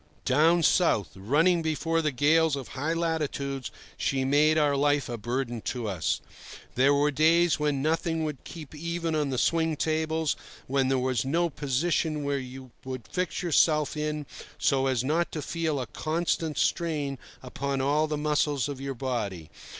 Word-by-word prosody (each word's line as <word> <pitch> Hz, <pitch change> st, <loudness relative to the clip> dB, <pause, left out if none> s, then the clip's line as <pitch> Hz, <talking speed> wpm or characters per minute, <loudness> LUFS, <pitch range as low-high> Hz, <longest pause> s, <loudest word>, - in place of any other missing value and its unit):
Down 160 Hz, +6 st, +4 dB
south, 110 Hz, -, +2 dB
running 150 Hz, -, +2 dB
before 165 Hz, +1 st, 0 dB
the 155 Hz, -2 st, 0 dB
gales 155 Hz, +3 st, +3 dB
of 135 Hz, -3 st, -7 dB
high 150 Hz, +5 st, -2 dB
latitudes, 145 Hz, -5 st, -2 dB, 0.3 s
she 135 Hz, -1 st, 0 dB
made 150 Hz, +3 st, +4 dB
our 145 Hz, -2 st, +3 dB
life 145 Hz, 0 st, +2 dB
a 120 Hz, -, -4 dB
burden 120 Hz, +1 st, -3 dB
to 120 Hz, -3 st, -3 dB
us. 80 Hz, -7 st, -1 dB, 0.5 s
There 135 Hz, +3 st, +4 dB
were 145 Hz, +1 st, +3 dB
days 160 Hz, +2 st, +3 dB
when 145 Hz, -2 st, 0 dB
nothing 160 Hz, +1 st, 0 dB
would 150 Hz, -4 st, -4 dB
keep 160 Hz, -4 st, -10 dB
even 170 Hz, +1 st, -3 dB
on 150 Hz, -2 st, 0 dB
the 130 Hz, -, -2 dB
swing 160 Hz, +3 st, +2 dB
tables, 160 Hz, 0 st, 0 dB, 0.3 s
when 135 Hz, 0 st, +1 dB
there 135 Hz, 0 st, +2 dB
was 130 Hz, -3 st, 0 dB
no 170 Hz, +5 st, 0 dB
position 150 Hz, +2 st, 0 dB
where 140 Hz, -1 st, 0 dB
you 130 Hz, 0 st, -9 dB
could 130 Hz, -3 st, -6 dB
fix 180 Hz, -1 st, -2 dB
yourself 155 Hz, -3 st, +3 dB, 0.6 s
so 135 Hz, -1 st, +2 dB
as 130 Hz, -3 st, +1 dB
not 160 Hz, +5 st, 0 dB
to 155 Hz, -, -3 dB
feel 160 Hz, -4 st, -1 dB
a 130 Hz, -, -2 dB
constant 160 Hz, +3 st, -2 dB
strain 150 Hz, -6 st, 0 dB, 0.2 s
upon 135 Hz, +2 st, -3 dB
all 145 Hz, +3 st, +2 dB
the 150 Hz, -1 st, -2 dB
muscles 150 Hz, -3 st, +1 dB
of 140 Hz, -2 st, -6 dB
your 135 Hz, -1 st, -4 dB
body. 105 Hz, -, -3 dB
145 Hz, 165 wpm, -27 LUFS, 130-160 Hz, 0.6 s, Down